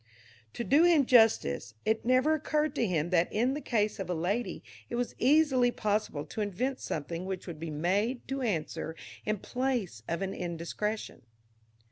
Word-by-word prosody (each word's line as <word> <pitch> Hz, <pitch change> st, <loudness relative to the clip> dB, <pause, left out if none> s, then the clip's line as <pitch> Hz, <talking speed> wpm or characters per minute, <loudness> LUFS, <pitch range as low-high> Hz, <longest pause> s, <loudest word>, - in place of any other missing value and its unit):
To 235 Hz, -, -3 dB
do 285 Hz, +7 st, +5 dB
him 335 Hz, -5 st, +5 dB
justice, 210 Hz, -, +3 dB
it 220 Hz, +1 st, +1 dB
never 255 Hz, +5 st, +3 dB
occurred 305 Hz, -1 st, 0 dB
to 240 Hz, -6 st, 0 dB
him 170 Hz, -2 st, 0 dB
that 175 Hz, -1 st, +3 dB
in 245 Hz, +5 st, +1 dB
the 295 Hz, -, -4 dB
case 215 Hz, -4 st, 0 dB
of 190 Hz, -2 st, -4 dB
a 180 Hz, -, 0 dB
lady 190 Hz, +5 st, -2 dB, 0.3 s
it -, -, -3 dB
was 245 Hz, 0 st, -1 dB
easily 265 Hz, -2 st, +4 dB
possible 210 Hz, -10 st, -1 dB
to 215 Hz, -, -5 dB
invent 245 Hz, +7 st, -2 dB
something 165 Hz, +3 st, -4 dB
which 190 Hz, -2 st, -4 dB
would 170 Hz, -4 st, -7 dB
be 165 Hz, 0 st, -5 dB
made 195 Hz, -, 0 dB
to 270 Hz, 0 st, -3 dB
answer 165 Hz, -7 st, -2 dB, 0.3 s
in 215 Hz, 0 st, +1 dB
place 245 Hz, -, -2 dB
of 170 Hz, +3 st, -2 dB
an 195 Hz, -, -3 dB
indiscretion. 175 Hz, +5 st, -4 dB
215 Hz, 170 wpm, -30 LUFS, 175-255 Hz, 0.3 s, do